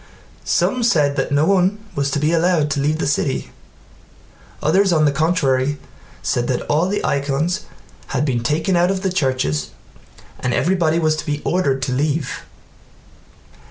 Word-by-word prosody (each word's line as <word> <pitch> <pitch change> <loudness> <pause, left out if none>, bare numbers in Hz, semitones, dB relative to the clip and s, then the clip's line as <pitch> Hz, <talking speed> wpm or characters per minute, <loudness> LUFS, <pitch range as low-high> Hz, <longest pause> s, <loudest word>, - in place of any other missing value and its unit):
Some 255 - +1
said 150 -11 +2
that - - -1
no 145 +2 +3
one 190 +2 +2 0.2
was 140 0 -1
to 140 - -1
be 150 +2 +1
allowed 165 -3 +2
to 140 - 0
leave 150 +3 +1
the - - -2
city, 140 -1 -1 1.1
others 190 +5 +2
on 155 -2 +3
the 145 - +3
contrary 145 -3 +1 0.5
said 120 0 0
that 125 - -1
all 155 +4 +1
the 205 +2 -2
icons 145 +8 -1 0.4
had 135 +2 -1
been 125 -5 0
taken 160 +9 0
out 175 +1 +3
of 190 0 -2
the 190 - 0
churches 130 - 0 0.7
and 125 -1 -1
everybody 170 -3 +1
was 155 -2 +2
to - - -5
be 145 0 -1
ordered 140 -7 0
to 125 - -1
leave. 145 +2 -2
150 Hz, 160 wpm, -20 LUFS, 140-175 Hz, 1.1 s, no